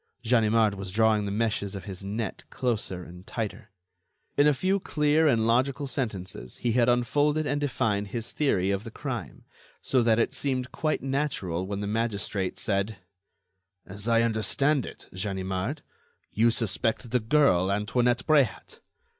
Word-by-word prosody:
Ganimard 110 -2 +3
was 100 -1 -6
drawing 110 +1 +3
the 100 - -3
meshes 105 -2 -1
of 95 - -6
his 95 -2 -6
net 105 +3 -4
closer 105 -7 -2
and 90 +2 -12
tighter. 110 -2 -5 0.7
In 145 +1 +5
a - - +6
few 190 +7 +1
clear 150 -2 +2
and 115 -6 +3
logical 130 +5 +2
sentences, 100 - -4
he 120 - 0
had 120 +1 +3
unfolded 145 +5 +2
and 145 0 -1
defined 110 -7 0
his 115 +3 -5
theory 100 -10 +1
of 100 +1 -1
the 115 - -7
crime, - - -6 0.4
so 130 - +1
that 115 -1 +3
it 115 - +1
seemed 130 -2 -2
quite 155 -4 -1
natural 130 - -1
when 100 0 -3
the - - -2
magistrate 105 -3 -2
said: 100 +1 -1 0.9
"As 100 +3 -7
I 115 0 +4
understand 115 +6 +1
it, - - -10
Ganimard, 95 - -3 0.5
you 115 +2 +3
suspect 115 +1 -1
the 125 - +3
girl 110 -7 +3
Antoinette 120 +5 +1
Bréhat?" 140 -10 +1
115 Hz, 155 wpm, -27 LUFS, 100-130 Hz, 0.9 s, a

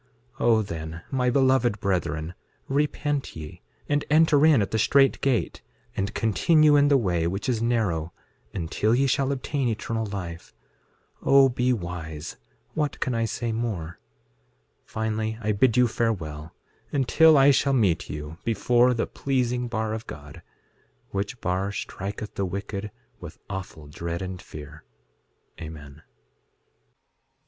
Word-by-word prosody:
6:11 - - 0
O 115 -2 +5
then, 80 -3 -6
my 125 -2 +1
beloved 130 -4 +3
brethren, 85 -4 -1 0.3
repent 145 0 -1
ye, 75 -1 -9 0.3
and 145 0 +1
enter 155 -1 +5
in 155 -6 +6
at 100 - -1
the 110 - 0
strait 135 +5 +4
gate, 135 -4 0 0.3
and 100 +2 -2
continue 150 - +4
in 145 0 +5
the 145 -1 +5
way 90 -8 0
which 95 +4 -3
is 120 -3 0
narrow, 100 -9 0 0.4
until 100 +5 0
ye 135 +2 +3
shall 135 +1 +1
obtain 135 0 -1
eternal 115 0 -2
life. 90 -4 -7 0.7
6:12 - - -9
O 135 -1 +7
be 125 0 +1
wise; 85 -7 -5 0.4
what 150 -2 -2
can 130 - -1
I 115 -1 +1
say 115 +1 -3
more? 100 -8 -3 0.9
6:13 - - -40
Finally, 110 0 -2
I 110 -1 -1
bid 115 +3 +3
you 125 -1 +5
farewell, 80 -10 -3 0.4
until 150 +3 +5
I 140 +1 +7
shall 140 0 +2
meet 95 -9 +1
you 75 +2 -7
before 120 +3 +3
the 115 - 0
pleasing 125 -2 -1
bar 110 -1 -2
of 110 +1 -6
God, 75 0 -10 0.7
which 100 +5 -3
bar 95 +3 -1
striketh 100 +1 -5
the 100 - -1
wicked 100 +2 -5 0.3
with - - -10
awful 95 -5 -6
dread 85 +4 -5
and 95 -1 -6
fear. 75 -2 -11 0.8
Amen. 75 -2 -9
110 Hz, 145 wpm, -25 LUFS, 85-130 Hz, 0.9 s, O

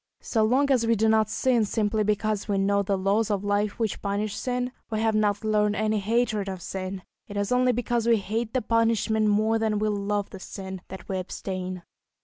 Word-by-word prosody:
So 220 -2 +1
long 265 +6 +3
as 240 -4 +3
we 230 - +4
do 220 +1 +2
not 220 -1 +3
sin 245 -2 +2
simply 215 0 0
because 210 0 0
we 200 -2 0
know 200 +1 +2
the 195 0 0
laws 200 +4 +1
of 205 -2 -1
life 205 0 0
which 225 -4 -2
punish 205 +1 -2
sin, 250 +1 -2 0.2
we 220 - -1
have 225 0 +2
not 210 -1 +1
learned 210 -1 +2
any 215 0 +1
hatred 215 -1 0
of 190 -1 -5
sin; 185 +1 -5 0.2
it 205 - -6
is 205 +2 -1
only 250 0 +4
because 240 -1 -1
we 230 -1 +5
hate 220 +4 -3
the 255 - +1
punishment 225 -1 +2
more 215 +2 +2
than 220 -1 +1
we 215 +1 +1
love 205 0 -1
the 195 - -8
sin, 190 -1 -7
that 190 -2 -9
we 190 -1 -2
abstain. 185 -1 -5
215 Hz, 210 wpm, -26 LUFS, 200-225 Hz, 0.2 s, we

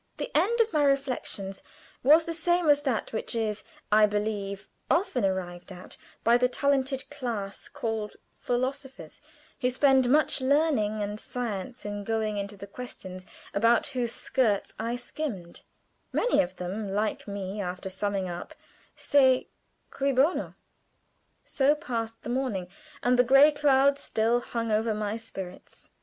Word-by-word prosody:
The - - -5
end 405 +10 +3
of 450 -4 0
my 300 -1 +3
reflections 260 -8 -1 0.4
was 305 +5 +6
the 335 - -4
same 345 +1 +1
as 290 0 +5
that 265 -7 -2
which 220 - -3
is, 215 -2 -1 0.3
I 210 0 +6
believe, 205 -1 -3 0.2
often 335 - +1
arrived 185 -1 -2
at 180 0 -9 0.3
by 235 +1 +5
the 250 0 +2
talented 270 0 0
class 230 -8 -5
called 225 -7 -3 0.2
philosophers, 260 +2 -4 0.4
who 250 -2 +2
spend 260 -1 +4
much 295 0 +4
learning 260 -7 +2
and 205 +1 -4
science 240 -1 -5
in 205 0 -4
going 220 -1 -1
into 200 0 -4
the 200 - -8
questions 190 -4 -9 0.3
about 230 +3 +3
whose 245 -2 -1
skirts 225 -7 0
I 230 +2 -1
skimmed; 245 - -6 0.5
many - - +3
of 185 +1 -4
them, 195 +3 -4
like 210 +2 -1
me, 200 0 -4
after 180 0 -4
summing 200 -1 -2
up, 175 0 -7 0.4
say, 260 -3 +3 0.4
Cui 275 0 0
bono? 275 +7 +1 0.9
So 280 +2 +3
passed 230 -6 -4
the - - -6
morning, 240 -8 -1 0.4
and 245 0 +3
the - - +8
gray 275 +4 +7
cloud 280 -1 +3
still 230 -1 +1
hung 230 -2 -3
over 220 +1 +1
my 210 0 -2
spirits. 190 -5 -9
230 Hz, 145 wpm, -28 LUFS, 205-270 Hz, 0.9 s, the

